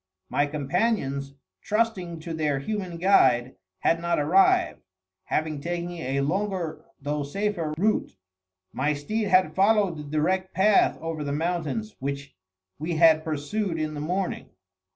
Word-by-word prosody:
My 145 - +1
companions, 145 - -1 0.3
trusting 195 -7 -1
to 165 +1 -5
their 150 -3 0
human 185 +3 -4
guide, 130 -9 +4 0.3
had 165 0 +2
not 170 0 0
arrived, 165 +7 +3 0.4
having 155 -2 -1
taken 175 +2 -3
a 140 -5 -2
longer 185 +2 -2 0.2
though 145 +1 -2
safer 170 +2 -2
route. 210 +5 +1 0.6
My 150 +1 +1
steed 210 +10 -2
had 185 -5 +4
followed 195 -2 +3
the 150 - -6
direct 175 +6 -1
path 200 +3 +4
over 165 -2 -3
the 140 - -3
mountains 175 +7 -2
which 140 -1 -5 0.4
we 165 +3 -2
had 160 -1 +5
pursued 165 +5 -2
in 155 0 -2
the 145 - -5
morning. 180 +5 -2
165 Hz, 135 wpm, -26 LUFS, 145-190 Hz, 0.6 s, had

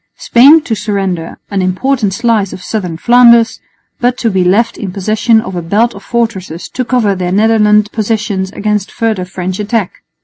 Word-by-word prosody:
Spain 285 +6 +5
to 230 - -3
surrender 195 -5 -3
an 200 -1 -1
important 205 +4 0
slice 215 -1 0
of 185 - -9
southern 185 -6 -4
Flanders, 235 +2 +4 0.4
but 245 +1 0
to 230 -3 -1
be 190 -1 +1
left 205 +6 +1
in 195 -4 -6
possession 215 +4 +1
of 220 -4 -6
a 175 - -3
belt 210 +8 0
of - - -11
fortresses 195 -8 -3
to 255 - -3
cover 240 -5 +1
their 180 -1 -3
Netherland 210 0 +3
possessions 210 -3 -2
against 210 -1 -2
further 220 -5 -2
French 185 0 -5
attack. 210 -2 -2
210 Hz, 170 wpm, -12 LUFS, 190-230 Hz, 0.4 s, Spain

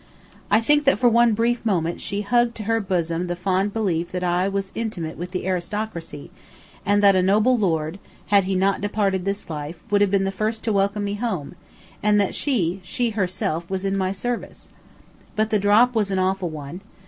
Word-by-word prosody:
I 210 - +5
think 295 +5 +3
that 275 - +4
for 245 - +3
one 235 -1 +4
brief 235 +2 0
moment 175 -6 -1
she 200 0 -2
hugged 240 +3 +2
to 215 - -6
her 225 +2 +1
bosom 175 -3 -1
the 175 - -2
fond 190 +2 0
belief 180 -6 -1
that 180 0 -2
I 180 +1 +1
was 195 -1 -3
intimate 190 -8 -4
with 175 +2 -6
the 185 0 -4
aristocracy, 180 -4 -4 0.5
and 205 +1 +2
that 200 -1 +6
a 185 - +4
noble 210 +7 +3
lord, 165 -4 -1 0.3
had 200 -2 +5
he 190 0 -1
not 195 +2 +1
departed 200 -3 0
this 200 +1 -3
life, 155 +1 -6
would 205 0 +3
have 205 - +4
been 195 0 +2
the 195 - -1
first 215 +3 -2
to 220 - 0
welcome 200 +1 +1
me 200 0 -2
home, 205 -10 -3 0.5
and 210 0 +3
that 200 - +1
she 195 - 0
she 235 +6 -1
herself 180 -4 -2
was 190 0 -3
in 195 0 0
my 190 -1 0
service. 240 +5 -5 0.6
But 215 0 0
the 215 - +3
drop 210 +5 +4
was 215 -4 +1
an 190 - -1
awful 185 -1 0
one. 155 +3 -8
195 Hz, 205 wpm, -23 LUFS, 180-215 Hz, 0.6 s, that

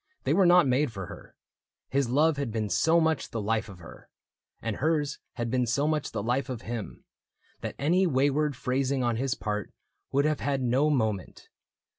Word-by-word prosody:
They - - +1
were 190 -2 +5
not 175 -4 +6
made 130 +1 +2
for 95 -4 -6
her. - - -12 0.6
His 135 -2 +1
love 150 +4 +3
had 140 -5 -2
been 110 -1 -2
so 160 - +4
much 160 -1 0
the 115 - -4
life 110 +1 -1
of 100 - -10
her. 85 -2 -13 0.5
And 115 -2 -3
hers 150 -1 0
had 120 -1 -3
been 125 -1 +1
so 140 +6 +1
much 155 -2 -1
the 100 - -3
life 125 +5 0
of 125 -3 -5
him. 115 -2 -6 0.5
That - - -5
any 180 +6 +2
wayward 145 0 +1
phrasing 130 +2 0
on 120 -2 0
his 130 0 -1
part 105 -1 -3 0.4
Would 140 +2 +2
have 155 -1 +1
had 135 -2 -1
no 130 +5 +2
moment. 110 - -2
135 Hz, 190 wpm, -28 LUFS, 115-150 Hz, 0.6 s, not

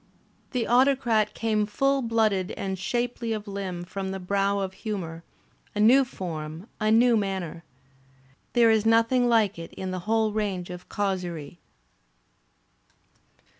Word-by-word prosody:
The 245 -3 -1
Autocrat 240 -4 +3
came 215 -2 0
full 275 +5 +1
blooded 220 -6 +1
and 190 -1 -4
shapely 240 +3 -2
of 215 -1 -5
limb 190 -3 -4
from 190 +2 -5
the 190 0 -4
brow 200 +2 0
of 190 -1 -2
humour, 170 -7 -4 0.5
a - - -2
new 245 +6 +6
form, 165 - -6
a 215 -1 +1
new 235 +2 +5
manner. 190 -5 -2 0.9
There 235 -2 +5
is 220 -1 +3
nothing 230 +2 +3
like 215 -6 +2
it 165 - -8
in 190 -1 -5
the 185 - -3
whole 220 -1 +2
range 195 -4 -2
of 180 0 -9
causerie. 180 -6 -3
205 Hz, 135 wpm, -26 LUFS, 185-230 Hz, 0.9 s, new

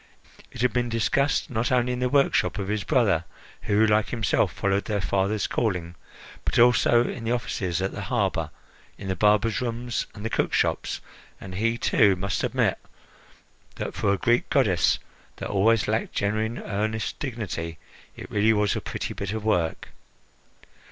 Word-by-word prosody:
It - - -7
had 125 - +2
been 120 -1 0
discussed 130 +6 +1
not 115 +1 -1
only 125 0 +2
in 125 - -3
the 125 0 +1
workshop 140 -4 +2
of 100 -1 -3
his 105 -1 -1
brother, 110 - +2 0.4
who, 105 +2 +3
like 105 0 +2
himself, 115 -5 +1
followed 100 0 0
their 105 -2 -1
father's 100 +3 0
calling, 90 -7 -1 0.5
but - - -1
also 120 0 +5
in 115 - -5
the 115 - -1
offices, 95 -7 -1
at 95 - -1
the - - -6
harbour, - - -1 0.5
in 95 - -7
the 95 - 0
barbers' 105 +3 +2
rooms 120 0 -3
and 105 0 -8
the - - 0
cookshops, - - 0 0.4
and 95 - -9
he, 115 +5 0
too, 105 -5 +4
must 100 +2 -2
admit - - +1 1.0
that, - - -4
for 100 - +1
a 100 - +1
Greek 120 +1 +1
goddess, - - +3 0.4
that - - -6
always 105 +2 +3
lacked 110 +2 -1
genuine, 110 +3 -1
earnest 110 +2 -2
dignity, 100 - -4 0.4
it - - -10
really 105 +2 +3
was 105 -2 +1
a - - -2
pretty - - -4
bit 100 0 -4
of 110 -1 -4
work. 85 -7 0
110 Hz, 165 wpm, -25 LUFS, 100-120 Hz, 1.0 s, also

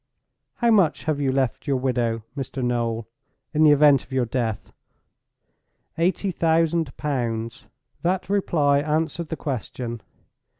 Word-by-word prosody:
"How 235 -1 +2
much 190 -8 +3
have 155 -3 -1
you 135 -2 +1
left 130 0 -1
your 140 - +2
widow, 120 -3 -1
Mr. 135 -1 -4
Noel, 115 -2 -1 0.5
in 155 - +1
the 155 - +7
event 145 -2 +5
of - - -23
your 130 -2 +1
death?" 115 -3 -3 1.2
"Eighty 185 +3 0
thousand 165 -3 +1
pounds." 120 -5 -3 0.3
That 180 +2 0
reply 155 -8 +2
answered 160 +2 -1
the 160 - -4
question. 120 -3 -4
140 Hz, 130 wpm, -24 LUFS, 120-160 Hz, 1.2 s, the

